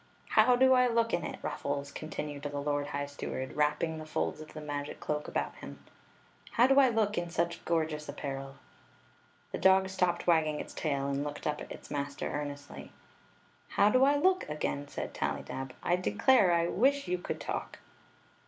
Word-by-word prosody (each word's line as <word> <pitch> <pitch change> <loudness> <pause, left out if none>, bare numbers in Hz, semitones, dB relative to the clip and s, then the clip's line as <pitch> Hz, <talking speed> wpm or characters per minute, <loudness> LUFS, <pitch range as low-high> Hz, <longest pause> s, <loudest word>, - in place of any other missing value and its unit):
"How 250 - +5
do 260 +1 +6
I 250 -1 +5
look 230 -1 +1
in 175 - +1
it, - - -5
Ruffles? 140 0 -3
continued 150 -2 -5
the 145 0 -4
lord 145 0 -1
high 145 -1 -2
steward, 140 -2 -5
wrapping 150 +2 +1
the 155 - -8
folds 155 0 -2
of 155 - -11
the - - -5
magic 145 -1 -5
cloak 150 0 -3
about 70 -1 -2
him; 70 0 -9 0.4
" - - -24
how 240 - +5
do 270 +1 +5
I 265 -2 +6
look 215 -4 +1
in 175 0 -4
such 170 0 -1
gorgeous 155 -3 -1
apparel? 135 -1 -5 0.5
" 60 +1 -33
The - - -3
dog 190 0 +5
stopped 180 -2 0
wagging 155 -3 +3
its - - -7
tail 140 -3 -1
and 140 0 -1
looked 145 0 -6
up 150 0 -1
at - - -9
its - - -10
master 140 0 -3
earnestly. 145 -1 -6 0.8
"How 205 +1 +4
do 255 +2 +5
I 285 +2 +5
look?" 370 - +2
again 145 -1 -2
said - - -5
Tallydab. 135 -1 -3
"I 175 - +2
de 180 - -1
clare, 215 - +5
I 170 0 +3
wish 275 +9 +2
you 180 0 0
could - - -4
talk - - -4
155 Hz, 190 wpm, -31 LUFS, 145-190 Hz, 0.8 s, do